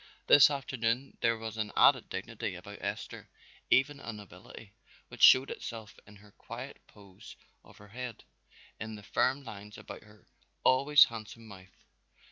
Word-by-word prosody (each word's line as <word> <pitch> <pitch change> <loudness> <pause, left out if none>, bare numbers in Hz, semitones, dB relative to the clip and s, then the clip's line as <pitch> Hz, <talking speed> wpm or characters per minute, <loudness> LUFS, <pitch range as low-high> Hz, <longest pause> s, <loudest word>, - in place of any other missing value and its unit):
This 145 - +7
afternoon 130 -2 -3
there 115 0 +2
was 110 0 -7
an 110 -1 -3
added - - +4
dignity - - -5
about - - -11
Esther, - - -6 0.4
even 140 +2 +2
a 115 - -7
nobility, 100 0 -13 0.4
which - - -12
showed 130 +1 +7
itself 110 -3 -8
in 105 - -15
the 105 - -19
quiet 125 +4 -9
poise 100 -3 -15 0.3
of - - -19
her 105 0 -16
head, 125 +2 -8 0.6
in 110 0 -6
the 105 - -12
firm 135 +7 0
lines 105 -3 -10
about - - -10
her 105 -1 -20 0.4
always 140 +3 +6
handsome 115 0 -7
mouth. 95 -2 -16
115 Hz, 150 wpm, -30 LUFS, 105-130 Hz, 0.6 s, This